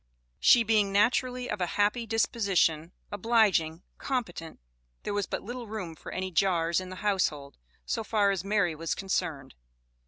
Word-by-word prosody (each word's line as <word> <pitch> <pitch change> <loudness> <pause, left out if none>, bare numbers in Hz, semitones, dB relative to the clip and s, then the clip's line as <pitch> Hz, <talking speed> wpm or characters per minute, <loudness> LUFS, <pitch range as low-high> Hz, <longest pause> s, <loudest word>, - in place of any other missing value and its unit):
She 240 - +6
being 215 -3 +2
naturally 245 +5 +1
of 210 -5 -4
a 180 - +1
happy 210 +3 +1
disposition, 195 -7 +1 0.2
obliging, 205 -6 +2 0.2
competent, 180 -11 -4 0.4
there - - -3
was 205 -2 -1
but - - -4
little 240 +1 -7
room 205 -6 -5
for - - -10
any 185 0 -4
jars 170 -1 +2
in 185 -1 -7
the 185 - -7
household, 150 - -1 0.3
so 225 - -2
far 210 -2 +2
as 190 -3 -2
Mary 195 -4 +1
was 165 +1 -3
concerned. 155 -8 -3
200 Hz, 155 wpm, -28 LUFS, 170-220 Hz, 0.4 s, She